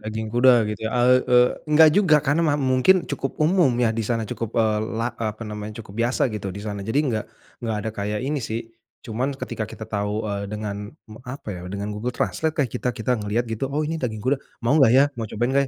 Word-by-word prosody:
Daging 110 Hz, 0 st, -5 dB
kuda 120 Hz, -2 st, +5 dB
gitu 105 Hz, -1 st, -4 dB
ya, -, -, -5 dB
e -, -, +3 dB, 0.3 s
e 125 Hz, -, +5 dB, 0.3 s
enggak 155 Hz, +1 st, +7 dB
juga 180 Hz, -6 st, +5 dB
karena 145 Hz, +4 st, +2 dB
ma 155 Hz, -3 st, +2 dB
mungkin 135 Hz, +7 st, +3 dB
cukup 135 Hz, -1 st, -3 dB
umum 175 Hz, -1 st, +4 dB, 0.2 s
ya 110 Hz, -, +2 dB
di 115 Hz, -, -2 dB
sana, 115 Hz, 0 st, -1 dB
cukup 115 Hz, +2 st, -5 dB
eee 110 Hz, -2 st, +2 dB, 0.2 s
la 115 Hz, +1 st, -1 dB
apa 110 Hz, -1 st, -4 dB
namanya 105 Hz, 0 st, -6 dB
cukup 95 Hz, -, -13 dB
biasa 120 Hz, +2 st, +1 dB
gitu 100 Hz, -2 st, -4 dB
di -, -, -6 dB
sana 100 Hz, -2 st, -4 dB
jadi 110 Hz, +8 st, -1 dB
enggak, 110 Hz, -6 st, -1 dB, 0.4 s
enggak 115 Hz, -2 st, -2 dB
ada 110 Hz, -, -1 dB
kayak 105 Hz, 0 st, -3 dB
ini 145 Hz, +1 st, -1 dB
sih, 115 Hz, -1 st, -3 dB, 0.4 s
cuman 130 Hz, +5 st, -2 dB
ketika 110 Hz, -, -4 dB
kita 110 Hz, -, -8 dB
tahu 105 Hz, 0 st, -2 dB
eee 100 Hz, 0 st, -3 dB
dengan 105 Hz, -1 st, -4 dB, 0.5 s
apa 130 Hz, -4 st, -7 dB
ya 90 Hz, -, -7 dB
dengan 100 Hz, +1 st, -3 dB
Google 115 Hz, +4 st, -4 dB
Translate 160 Hz, 0 st, -1 dB
lah 145 Hz, -, +3 dB
kita 125 Hz, -, -2 dB
kita 125 Hz, +2 st, 0 dB
ngelihat 105 Hz, +4 st, -1 dB
gitu, 130 Hz, +5 st, -2 dB
oh 150 Hz, +3 st, -1 dB
ini 160 Hz, +1 st, -3 dB
daging 110 Hz, -4 st, -3 dB
kuda, 140 Hz, +2 st, +3 dB, 0.3 s
mau 120 Hz, +5 st, +3 dB
gak 120 Hz, -3 st, +6 dB
ya? 135 Hz, -, +7 dB, 0.2 s
Mau 110 Hz, -, -3 dB
cobain 120 Hz, +5 st, -1 dB
gak 140 Hz, -, +4 dB
115 Hz, 225 wpm, -23 LUFS, 105-135 Hz, 0.5 s, enggak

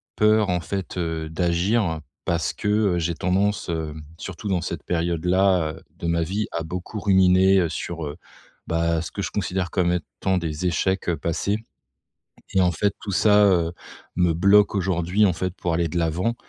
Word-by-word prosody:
peur 105 Hz, -1 st, +3 dB
en 90 Hz, -1 st, +1 dB
fait, 95 Hz, +1 st, -5 dB
heu, 80 Hz, -2 st, -2 dB
d'agir, 85 Hz, +1 st, +1 dB, 0.2 s
parce 85 Hz, -1 st, 0 dB
que, 105 Hz, -, -5 dB, 0.3 s
heu, -, -, 0 dB
j'ai 85 Hz, 0 st, -1 dB
tendance, 95 Hz, +3 st, 0 dB
hem, 80 Hz, -2 st, -4 dB
surtout 95 Hz, +4 st, -6 dB
dans 90 Hz, -3 st, +1 dB
cette 85 Hz, -, -5 dB
période-là, 90 Hz, 0 st, +1 dB
heu, -, -, -14 dB, 0.2 s
de 85 Hz, -, -4 dB
ma 85 Hz, 0 st, +1 dB
vie 100 Hz, +6 st, -2 dB
à 85 Hz, -, -3 dB
beaucoup 90 Hz, +5 st, -5 dB
ruminer, 95 Hz, -1 st, +5 dB
heu, 85 Hz, -, 0 dB
sur 85 Hz, 0 st, -5 dB
heu, 75 Hz, +2 st, -7 dB, 0.5 s
bah, 85 Hz, 0 st, +1 dB
ce 85 Hz, -, -6 dB
que 100 Hz, -, -4 dB
je -, -, -3 dB
considère 95 Hz, -2 st, -2 dB
comme 90 Hz, -1 st, +1 dB
étant 90 Hz, +3 st, -2 dB
des 85 Hz, 0 st, -3 dB
échecs, 95 Hz, +2 st, 0 dB
heu, 85 Hz, -, +1 dB
passés. 85 Hz, +7 st, -1 dB, 1.0 s
Et 95 Hz, -, +4 dB
en 90 Hz, -, +3 dB
fait 100 Hz, +4 st, 0 dB
tout 100 Hz, -, -6 dB
ça, 105 Hz, +2 st, +5 dB
heu, 85 Hz, -4 st, +2 dB, 0.4 s
me 90 Hz, -1 st, +3 dB
bloque 100 Hz, +5 st, +4 dB
aujourd'hui 95 Hz, +2 st, +2 dB
en 95 Hz, -, +2 dB
fait 90 Hz, +2 st, -2 dB
pour 85 Hz, -2 st, -2 dB
aller 85 Hz, 0 st, +1 dB
de 85 Hz, -, -2 dB
l'avant, 85 Hz, +7 st, 0 dB
90 Hz, 185 wpm, -23 LUFS, 85-95 Hz, 1.0 s, ruminer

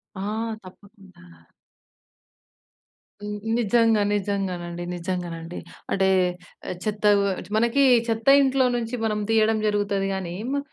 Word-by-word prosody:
ఆ! -, -, -7 dB, 0.4 s
తప్పకుండా. 190 Hz, -, -16 dB, 2.0 s
హ్మ్. 210 Hz, 0 st, -5 dB, 0.2 s
నిజంగా, 225 Hz, -1 st, +3 dB
నిజంగానండి. 185 Hz, -4 st, -3 dB
నిజంగానండి. 175 Hz, -1 st, -5 dB, 0.3 s
అంటే, 190 Hz, -1 st, +2 dB, 0.6 s
ఆహ్, -, -, -3 dB
చెత్తవ్వచ్చు 205 Hz, -3 st, +1 dB
మనకీ 235 Hz, +5 st, +3 dB, 0.2 s
చెత్త 225 Hz, +1 st, -2 dB
ఇంట్లో 265 Hz, -1 st, +3 dB
నుంచి 235 Hz, 0 st, -3 dB
మనం 210 Hz, -1 st, 0 dB
తీయడం 220 Hz, 0 st, +3 dB
జరుగుతది 205 Hz, -1 st, 0 dB
గానీ, 185 Hz, -3 st, -4 dB, 0.2 s
మా 285 Hz, -, 0 dB
205 Hz, 100 wpm, -24 LUFS, 185-225 Hz, 2.0 s, నిజంగా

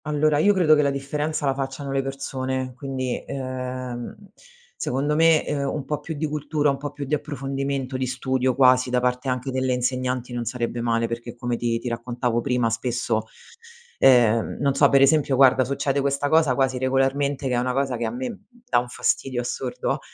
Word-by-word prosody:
Allora 150 Hz, 0 st, +2 dB
io 205 Hz, +7 st, +5 dB
credo 170 Hz, -5 st, +5 dB
che 150 Hz, -, +5 dB
la 140 Hz, -, +2 dB
differenza 145 Hz, +2 st, -2 dB
la 135 Hz, -, +2 dB
facciano 135 Hz, +1 st, -4 dB
le 135 Hz, 0 st, +1 dB
persone, 130 Hz, -1 st, -4 dB
quindi, 130 Hz, -1 st, -4 dB
uhm, 130 Hz, -2 st, -5 dB, 0.6 s
secondo 140 Hz, +4 st, -1 dB
me, 165 Hz, 0 st, +5 dB
uhm, 140 Hz, -2 st, -1 dB
un 145 Hz, -3 st, -4 dB
po' 150 Hz, +1 st, -2 dB
più 160 Hz, +2 st, -6 dB
di 155 Hz, +2 st, -2 dB
cultura, 150 Hz, -1 st, 0 dB
un 135 Hz, -, -3 dB
po' 145 Hz, +1 st, -5 dB
più 145 Hz, -, -6 dB
di 140 Hz, -, -4 dB
approfondimento, 135 Hz, -2 st, -3 dB
di 130 Hz, 0 st, -2 dB
studio 130 Hz, 0 st, 0 dB
quasi 130 Hz, -1 st, +4 dB
da 125 Hz, 0 st, +2 dB
parte 125 Hz, +2 st, -1 dB
anche 125 Hz, +1 st, -2 dB
delle 130 Hz, 0 st, 0 dB
insegnanti 125 Hz, 0 st, -2 dB
non 120 Hz, -1 st, -3 dB
sarebbe 120 Hz, 0 st, -3 dB
male, 115 Hz, 0 st, +1 dB
perché 120 Hz, +1 st, -6 dB
come 120 Hz, 0 st, -2 dB
ti 115 Hz, 0 st, -1 dB
ti 115 Hz, -, -6 dB
raccontavo 120 Hz, 0 st, -2 dB
prima 125 Hz, -3 st, 0 dB
spesso, 120 Hz, +1 st, -1 dB, 0.7 s
ehm, 115 Hz, -4 st, +4 dB
non 140 Hz, -1 st, +2 dB
so, 140 Hz, 0 st, +4 dB
per 140 Hz, -, +5 dB
esempio 140 Hz, -1 st, +3 dB
guarda 130 Hz, -1 st, +5 dB
succede 140 Hz, +1 st, -1 dB
questa 140 Hz, +1 st, 0 dB
cosa 155 Hz, -5 st, +4 dB
quasi 130 Hz, -1 st, +1 dB
regolarmente, 135 Hz, +2 st, 0 dB
che 125 Hz, -, -1 dB
è -, -, +2 dB
una 125 Hz, +1 st, -1 dB
cosa 135 Hz, -1 st, 0 dB
che 120 Hz, 0 st, -2 dB
a -, -, -1 dB
me 255 Hz, +1 st, -4 dB
m 220 Hz, -, -9 dB, 0.3 s
dà 245 Hz, -, +3 dB
un 120 Hz, -, -5 dB
fastidio 120 Hz, +1 st, -1 dB
assurdo, 125 Hz, +1 st, -3 dB
130 Hz, 195 wpm, -24 LUFS, 125-140 Hz, 0.7 s, io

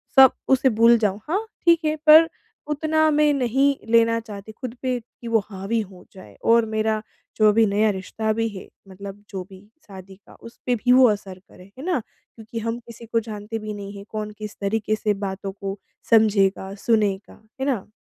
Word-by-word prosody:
सब 265 Hz, -2 st, +9 dB, 0.2 s
उसे 265 Hz, 0 st, +4 dB
भूल 230 Hz, +1 st, +5 dB
जाऊँ। 205 Hz, -3 st, 0 dB
हाँ 400 Hz, +7 st, 0 dB, 0.2 s
ठीक 335 Hz, -1 st, +4 dB
है 305 Hz, 0 st, +1 dB
पर 320 Hz, +2 st, +9 dB, 0.4 s
उतना 315 Hz, +1 st, +2 dB
मैं 300 Hz, 0 st, +3 dB
नहीं 270 Hz, +1 st, +2 dB, 0.2 s
लेना 230 Hz, 0 st, +4 dB
चाहती 210 Hz, -2 st, -10 dB
खुद 235 Hz, +2 st, -7 dB
पे 255 Hz, -2 st, -1 dB
कि 235 Hz, +1 st, -14 dB
वो 230 Hz, -1 st, +3 dB
हावी 195 Hz, +4 st, -2 dB
हो 185 Hz, -2 st, -12 dB
जाए। 105 Hz, -, -14 dB
और 230 Hz, 0 st, +5 dB
मेरा 220 Hz, 0 st, -1 dB, 0.4 s
जो 215 Hz, -, +5 dB
अभी 225 Hz, +2 st, +4 dB
नया 210 Hz, +1 st, +2 dB
रिश्ता 210 Hz, +3 st, -3 dB
भी 225 Hz, +1 st, -1 dB
है 195 Hz, -3 st, -10 dB, 0.2 s
मतलब 200 Hz, +1 st, -10 dB
जो 190 Hz, -2 st, -5 dB
भी 190 Hz, -, -13 dB, 0.3 s
शादी 190 Hz, -1 st, -12 dB
का 200 Hz, -, -20 dB
उस 230 Hz, -, -13 dB
पे 250 Hz, -, +2 dB
भी 245 Hz, +2 st, +1 dB
वो 255 Hz, 0 st, +7 dB
असर 195 Hz, -3 st, -4 dB
करे, -, -, -16 dB
है 265 Hz, -, -8 dB
ना। 355 Hz, -7 st, +1 dB, 0.4 s
क्योंकि 225 Hz, 0 st, -7 dB
हम 230 Hz, +1 st, -3 dB
किसी 235 Hz, -1 st, -13 dB
को 230 Hz, 0 st, 0 dB
जानते 215 Hz, 0 st, -6 dB
भी 215 Hz, 0 st, -6 dB
नहीं 200 Hz, 0 st, -8 dB
है 200 Hz, -, -9 dB
कौन 215 Hz, -1 st, -5 dB
किस 210 Hz, -1 st, -7 dB
तरीके 215 Hz, +1 st, 0 dB
से 215 Hz, -1 st, 0 dB
बातों 195 Hz, 0 st, -5 dB
को 195 Hz, 0 st, -6 dB, 0.3 s
समझेगा, 200 Hz, -3 st, +3 dB
सुनेगा 210 Hz, -2 st, -1 dB, 0.2 s
है -, -, 0 dB
ना। 235 Hz, -8 st, -2 dB
220 Hz, 195 wpm, -23 LUFS, 200-240 Hz, 0.4 s, सब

